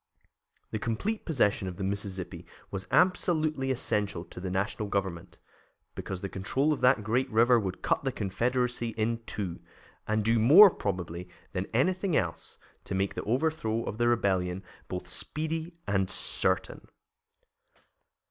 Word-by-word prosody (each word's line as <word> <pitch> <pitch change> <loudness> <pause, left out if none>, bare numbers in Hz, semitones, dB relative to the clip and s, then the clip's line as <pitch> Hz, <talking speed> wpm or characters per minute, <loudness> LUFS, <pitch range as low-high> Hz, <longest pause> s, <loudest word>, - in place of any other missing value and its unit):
The 110 - -2
complete 120 - -2
possession 105 - +1
of 90 - -6
the 100 - -4
Mississippi 95 -1 -4 0.2
was 95 -1 -4
absolutely 155 -6 +2
essential 105 -8 -1
to 85 - -11
the 95 +1 -4
National 100 +3 -2
Government, 95 -4 -3 0.6
because 95 -2 -5
the 100 - -3
control 130 +11 0
of 145 - -5
that 125 -3 +4
great 125 +5 0
river 120 +1 +5
would 95 -3 -4
cut - - +1
the 135 - 0
Confederacy 120 +3 -1
in 115 +1 0
two, 95 -5 -4 0.5
and 110 -1 0
do 115 0 +3
more, 170 - +9
probably, 90 - -4 0.2
than 95 0 -3
anything 180 - +1
else, 85 -3 -2 0.3
to - - -3
make 95 +1 0
the - - -4
overthrow 120 -3 0
of 110 - -5
the 120 - +3
Rebellion 95 -5 +1 0.2
both 90 0 -5
speedy 160 - -3
and 95 -2 +1
certain. - - +1
110 Hz, 145 wpm, -29 LUFS, 95-130 Hz, 0.6 s, more